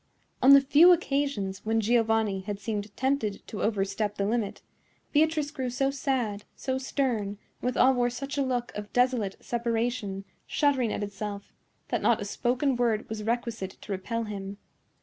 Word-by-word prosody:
On 270 +2 +8
the 275 - +9
few 300 +6 +7
occasions 275 - 0
when 225 +1 +1
Giovanni 225 -3 +2
had 200 +1 -5
seemed 210 -1 -3
tempted 260 -6 -1
to 210 - -6
overstep 205 0 0
the 200 - -1
limit, 220 -1 -1 0.5
Beatrice 305 -1 +2
grew 260 -4 -3
so 270 +2 0
sad, 255 -7 -1
so 260 -1 -2
stern, 265 -3 0
and 200 0 -5 0.2
withal 255 +1 +4
wore 245 -1 +2
such 275 +4 -5
a 285 - +1
look 245 -2 -1
of 210 0 -6
desolate 245 -6 +1
separation, 230 -4 -2 0.2
shuddering 270 -6 +2
at - - -2
itself, 200 0 -6 0.4
that - - 0
not - - +3
a - - -4
spoken 255 +2 0
word 230 -3 +1
was 220 -1 -4
requisite 225 -3 -3
to 210 - -8
repel 230 +5 -2
him. 200 -2 -6
230 Hz, 165 wpm, -28 LUFS, 205-265 Hz, 0.5 s, the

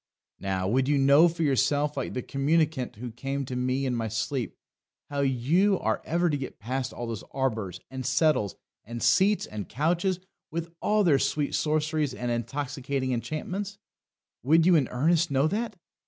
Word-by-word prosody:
Now, 95 -1 -1
would 130 +5 +2
you 145 0 +3
know 140 +4 +6
for 165 0 -2
yourself, 145 +1 +2
like 135 - -3
the 125 - -2
communicant 150 -1 0
who 120 +3 -6
came 135 +4 -3
to 125 - -5
me 130 +2 0
in 125 -2 0
my 115 -1 -1
sleep, 110 +4 -3 0.5
how 140 - -2
you 145 +10 +2
are - - -1
ever 175 +2 +1
to 150 -3 +1
get 135 -2 -6
past 125 +3 -3
all 120 - -5
those 115 -4 -5
arbours, 110 -9 -2
and 130 0 -5
settles, 130 - +2 0.3
and 120 +2 -6
seats, 190 - +4
and 105 -4 -7
couches, 175 - 0 0.3
with 170 +1 -4
all 210 0 +3
their 150 -7 +4
sweet 145 +1 0
sorceries 155 -2 0
and 120 -1 -3
intoxicating 130 +2 -2
enchantments 185 - -4 0.6
would 160 +5 +4
you 180 -1 +6
in 140 -6 +3
earnest 165 +6 +2
know 140 +2 +2
that? 215 +4 -2
140 Hz, 170 wpm, -27 LUFS, 125-160 Hz, 0.6 s, know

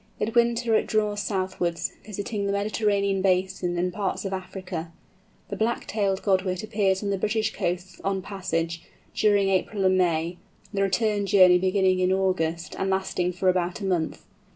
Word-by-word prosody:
In 220 +1 -1
winter 235 -1 +2
it 220 - +2
draws 210 -1 0
southwards, 185 -3 -2
visiting 205 0 -4
the - - 0
Mediterranean 200 -1 +1
basin 185 -1 0
and 180 +1 0
parts 200 0 -2
of 195 - -3
Africa. 185 -3 -5 0.6
The - - -3
Black 230 +2 -1
tailed 200 -2 -1
Godwit 185 -2 +1
appears 205 -3 0
on 200 - -1
the 195 - -1
British 220 +2 0
coasts 180 +1 -3
on 195 -1 -1
passage, 170 -4 -3 0.3
during 205 -2 +3
April 195 +1 0
and 185 0 +4
May, 170 0 +1 0.4
the 195 - 0
return 205 +1 +1
journey 185 -2 +6
beginning 185 0 +2
in 185 0 +2
August, 180 -3 0
and 190 - 0
lasting 190 -2 0
for 185 +2 -1
about 180 0 +1
a 200 - -4
month. 175 -4 -1
190 Hz, 165 wpm, -25 LUFS, 180-205 Hz, 0.6 s, journey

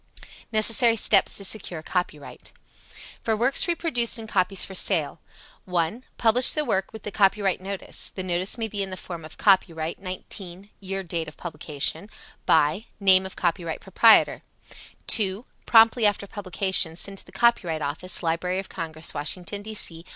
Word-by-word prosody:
Necessary 225 +2 +4
Steps 205 -2 +3
to 200 - -3
Secure 185 -6 -3
Copyright. 165 -5 -5 0.7
For 220 -1 0
works 255 +9 +4
reproduced 315 -9 0
in 225 - -8
copies 195 -2 +1
for 190 - -10
sale: 170 -5 0 0.5
1. 180 +7 -2
Publish 240 +2 +5
the 305 -1 -2
work 190 -5 -1
with 220 -2 -10
the 210 - -6
copyright 195 -2 +1
notice. 195 0 -3
The 185 - -7
notice 185 +4 -1
may 225 -1 -3
be 205 -1 -5
in 195 - -3
the 185 - -7
form 170 -4 -8
"Copyright, 170 -5 +1
19..... 185 0 -8
(year 195 0 -5
date 165 -2 -4
of 150 - -12
publication) 160 +2 -4 0.4
by 160 +8 +2
(name 190 -1 +4
of 190 - -13
copyright 170 -2 -2
proprietor)." 220 +4 +4 0.6
2. 205 +1 +1 0.2
Promptly 225 0 +5
after 205 -1 -1
publication, 190 -4 +1
send 195 +3 -5
to - - -11
the - - -15
Copyright 175 -10 +1
Office, 165 +6 -4
Library 170 +3 -1
of 190 0 -5
Congress, 160 -1 -3
Washington, 175 +7 -4
D. 215 +1 -8
C. 165 -5 0
190 Hz, 160 wpm, -24 LUFS, 170-215 Hz, 0.7 s, Publish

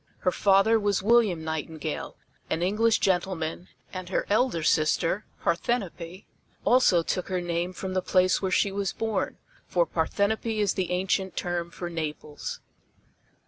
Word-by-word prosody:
Her 180 - +2
father 200 +4 +4
was 205 -2 0
William 215 -7 +3
Nightingale, 160 0 -4 0.3
an 165 - 0
English 220 +4 +3
gentleman, 180 -2 -1 0.3
and 185 -1 -6
her - - 0
elder 215 -7 +2
sister, 165 +5 +2 0.2
Parthenope, 180 -1 -2 0.4
also 240 -9 +5
took 180 +2 -2
her 185 -2 -1
name 175 0 -2
from 185 0 -5
the 185 - +1
place 185 0 +2
where 190 - 0
she 195 +2 +2
was 195 -1 -2
born, 220 -4 -2 0.3
for 175 -1 +2
Parthenope 205 +7 0
is 205 -2 +2
the 185 -2 -2
ancient 190 +1 -1
term 175 -1 -2
for 175 +1 -6
Naples. 155 -3 -5
185 Hz, 140 wpm, -27 LUFS, 170-200 Hz, 0.4 s, also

